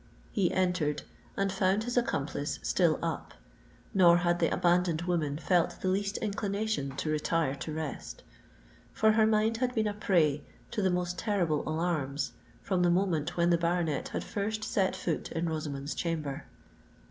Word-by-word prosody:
He 195 -6 +1
entered, 180 -6 0 0.3
and 195 0 +1
found 190 +2 +1
his 245 +1 -3
accomplice 245 -1 -1
still - - +3
up; - - -3 0.6
nor 175 -4 +6
had 175 0 +1
the 165 - +2
abandoned 175 -2 +2
woman 160 -5 0
felt 170 +2 +1
the 185 - -1
least 200 +2 0
inclination 200 -8 -2
to 155 +3 -2
retire 155 -1 +1
to 155 - -5
rest. 155 -2 -5 0.7
For 220 0 +4
her 220 0 +4
mind 220 +1 +2
had 250 +1 -1
been 220 -1 +2
a 210 - 0
prey 165 -8 +2 0.3
to 220 - -1
the 190 - +3
most 180 0 -1
terrible 175 -9 +1
alarms, 155 -4 -1 0.3
from 185 -2 0
the 175 - +4
moment 175 -2 +1
when 170 0 +3
the 170 - +3
baronet 170 -4 0
had - - -4
first 215 +1 -3
set 195 -3 +1
foot 175 -3 -3
in 170 +1 -1
Rosamond's 150 -3 -3
chamber. 155 -4 -3
175 Hz, 160 wpm, -30 LUFS, 155-200 Hz, 0.7 s, nor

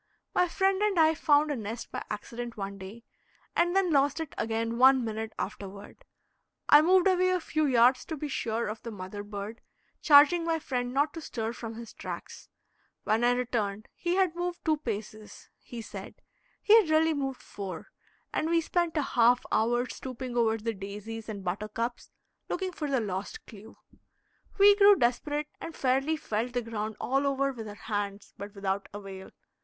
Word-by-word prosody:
My 360 - +3
friend 385 +2 +1
and 420 -3 +1
I 320 -1 +5
found 300 -1 +3
a - - 0
nest 225 0 -6
by - - -4
accident 235 +3 -6
one 200 0 -5
day, 200 +5 -10 0.5
and 350 +1 +2
then 385 -3 +3
lost 285 +1 +3
it 320 -3 -5
again 230 +1 -2
one 260 -1 +6
minute 220 0 -4
afterward. 200 - -7 0.6
I 295 - +8
moved 365 +3 +4
away 370 -1 +3
a 365 0 +2
few 310 -2 0
yards 250 0 +4
to 320 - -5
be 300 - -4
sure 230 -4 -2
of 215 +1 -5
the 235 - -6
mother 205 -1 -7
bird, 205 +2 -7 0.4
charging 300 +3 +7
my 330 -1 +1
friend 250 -5 -3
not 285 +3 +1
to 330 - -7
stir 225 -5 -4
from 230 -2 -7
his 230 -1 -9
tracks. - - -8 0.5
When 220 +2 +1
I 245 0 +4
returned, 220 -4 -2
he 350 0 -1
had 375 -3 +2
moved 350 0 -4
two 310 -2 +2
paces, 215 -5 -7
he 235 -2 -8
said - - -9 0.5
(he 430 - +7
had 345 - -6
really 315 +1 +4
moved 270 -3 -3
four), 190 -5 -7 0.4
and 315 - 0
we 335 0 +4
spent 335 0 -1
a 300 - +2
half 245 -1 +3
hour 240 +3 +2
stooping 255 -1 -6
over 225 -2 +2
the 225 +1 -3
daisies 210 +3 -7
and 205 -2 -5
the - - -13
buttercups, 215 +6 -3 0.4
looking 375 0 -2
for 300 -4 -4
the 265 -3 +1
lost 195 -2 -5
clew. 215 +1 -13 0.8
We 405 0 +7
grew 405 0 +8
desperate, 290 +3 0
and 330 - -7
fairly 270 +4 +1
felt 240 -4 -3
the 245 -1 -1
ground 220 -1 -4
all 275 +2 +1
over 275 0 +1
with 225 -4 -8
our 205 - -8
hands, 205 -2 -4
but 200 +1 -9
without 195 0 -2
avail. 195 -2 -8
245 Hz, 180 wpm, -29 LUFS, 215-310 Hz, 0.8 s, I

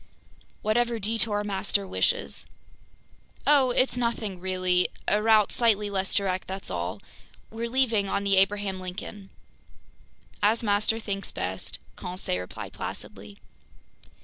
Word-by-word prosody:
"Whatever 235 +2 +2
detour 215 0 +2
master 200 0 0
wishes." - - 0 1.0
"Oh, 280 -3 +5
it's 255 0 +2
nothing 230 -6 -2
really! 185 -1 +2 0.2
A 210 - +3
route 215 -2 +5
slightly 210 -3 +2
less 195 -1 -1
direct, 190 -2 0
that's 190 +1 -4
all. 90 +3 -3 0.5
We're 230 +1 -4
leaving 230 -6 +2
on 200 - 0
the 195 -1 +3
Abraham 195 0 +2
Lincoln." 190 +2 -7 1.1
"As 220 +3 +3
master 210 +1 +2
thinks 200 -3 -3
best," 95 +1 -3 0.2
Conseil 180 - -3
replied 90 - -7
placidly. 100 +1 -7
200 Hz, 120 wpm, -27 LUFS, 185-225 Hz, 1.1 s, Oh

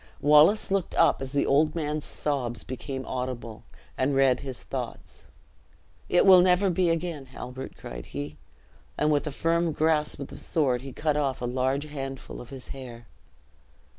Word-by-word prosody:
Wallace 150 +9 +5
looked 195 -2 0
up - - +4
as 135 -1 -4
the 140 0 +1
old 150 +3 +3
man's 150 -2 -2
sobs 125 -7 -2
became 130 +1 -5
audible, 125 -3 -5 0.3
and 135 +2 +1
read 135 -2 +4
his 130 -3 -6
thoughts: - - -7 0.8
"It 175 - +4
will 185 -2 +9
never 185 +1 +3
be 175 0 +2
again, 165 -4 -2
Halbert," 130 +1 -8
cried - - -8
he, 75 +2 -6 0.6
and 150 0 +2
with 150 +1 +1
a - - -2
firm 165 +2 +1
grasp 155 0 +1
of 140 - -6
the - - -10
sword 130 -6 +1
he 135 0 -8
cut 150 +2 0
off 140 -3 0
a 120 - -3
large 130 +3 0
handful 135 -3 -6
of 120 - -11
his 135 -2 -10
hair. 120 -4 -9
140 Hz, 165 wpm, -27 LUFS, 130-155 Hz, 0.8 s, will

